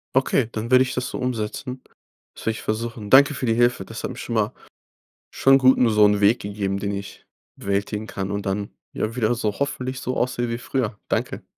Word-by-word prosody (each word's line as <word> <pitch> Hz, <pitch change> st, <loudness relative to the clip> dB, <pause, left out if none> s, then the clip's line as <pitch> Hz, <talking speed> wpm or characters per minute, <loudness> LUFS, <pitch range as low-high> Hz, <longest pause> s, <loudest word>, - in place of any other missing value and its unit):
Okay, 130 Hz, -2 st, +2 dB
dann 115 Hz, +2 st, -5 dB
werde 130 Hz, 0 st, +7 dB
ich 130 Hz, -, -4 dB
das 125 Hz, 0 st, -2 dB
so -, -, -5 dB
umsetzen. 125 Hz, +2 st, -3 dB, 0.5 s
Das -, -, -12 dB
werde 110 Hz, -, +2 dB
ich 110 Hz, -, -7 dB
versuchen. 110 Hz, -1 st, -4 dB
Danke 140 Hz, +4 st, +7 dB
für 135 Hz, -, -3 dB
die 115 Hz, -, +2 dB
Hilfe. 120 Hz, -4 st, +2 dB
Das 115 Hz, +3 st, -8 dB
hat -, -, -3 dB
mir 125 Hz, -, -9 dB
schon 120 Hz, -, -4 dB
mal 110 Hz, -1 st, +1 dB, 0.8 s
schon 135 Hz, 0 st, +5 dB
gut, 130 Hz, -1 st, +5 dB
nur 120 Hz, -3 st, +3 dB
so'nen 105 Hz, -1 st, +4 dB
Weg 105 Hz, +4 st, +4 dB
gegeben, 100 Hz, -1 st, -3 dB
den 100 Hz, 0 st, -2 dB
ich 100 Hz, 0 st, -7 dB, 0.3 s
bewältigen 100 Hz, +2 st, -2 dB
kann, 95 Hz, -3 st, -4 dB
und 100 Hz, 0 st, -3 dB
dann 100 Hz, +1 st, -2 dB, 0.2 s
ja 110 Hz, +1 st, -3 dB
wieder 120 Hz, -1 st, +1 dB
so 105 Hz, -3 st, -2 dB
hoffentlich 130 Hz, -2 st, -2 dB
so 130 Hz, +1 st, -3 dB
aussehe 120 Hz, -1 st, -1 dB
wie 115 Hz, -, -2 dB
früher. 125 Hz, -5 st, -2 dB
Danke. -, -, -2 dB
115 Hz, 215 wpm, -23 LUFS, 105-125 Hz, 0.8 s, werde